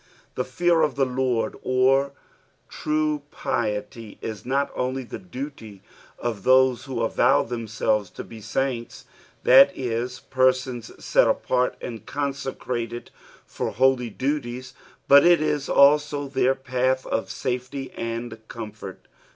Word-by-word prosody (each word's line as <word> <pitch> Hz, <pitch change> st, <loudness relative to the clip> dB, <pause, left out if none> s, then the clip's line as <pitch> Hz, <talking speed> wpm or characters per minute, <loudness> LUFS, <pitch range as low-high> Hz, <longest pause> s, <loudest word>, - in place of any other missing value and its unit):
The -, -, -1 dB
fear 175 Hz, -2 st, +2 dB
of 155 Hz, -, +1 dB
the 135 Hz, -1 st, +2 dB
Lord 125 Hz, -2 st, -1 dB
or 135 Hz, +2 st, +2 dB, 0.5 s
true 155 Hz, -1 st, -1 dB
piety 110 Hz, -5 st, -3 dB
is 110 Hz, +1 st, -7 dB
not 140 Hz, +2 st, 0 dB
onl; 130 Hz, 0 st, -3 dB
the -, -, -7 dB
duty 130 Hz, -, -8 dB, 0.3 s
of 115 Hz, -4 st, -3 dB
those 130 Hz, +1 st, +4 dB
who 125 Hz, -4 st, -3 dB
avow 115 Hz, -, +3 dB
themselves 110 Hz, -3 st, -1 dB
to -, -, -8 dB
be 110 Hz, -1 st, -11 dB
saints, 120 Hz, +2 st, -3 dB, 0.4 s
that 160 Hz, +9 st, +8 dB
is, 125 Hz, 0 st, -3 dB
persons 130 Hz, -2 st, 0 dB, 0.2 s
set -, -, +4 dB
apart 125 Hz, 0 st, +1 dB
and 115 Hz, -2 st, -6 dB
consecrated 130 Hz, -4 st, -4 dB, 0.3 s
for -, -, -4 dB
holy 130 Hz, 0 st, +2 dB
dudes, 130 Hz, 0 st, -3 dB, 0.3 s
but 140 Hz, 0 st, +8 dB
it 175 Hz, -1 st, +6 dB
is 150 Hz, -2 st, -1 dB
also 145 Hz, 0 st, +4 dB
their 135 Hz, -1 st, +2 dB
path 130 Hz, 0 st, -1 dB
of 110 Hz, -, -2 dB
safety 130 Hz, +1 st, -4 dB
and 115 Hz, 0 st, -5 dB
comfort. 105 Hz, -4 st, -9 dB
130 Hz, 125 wpm, -24 LUFS, 115-140 Hz, 0.5 s, that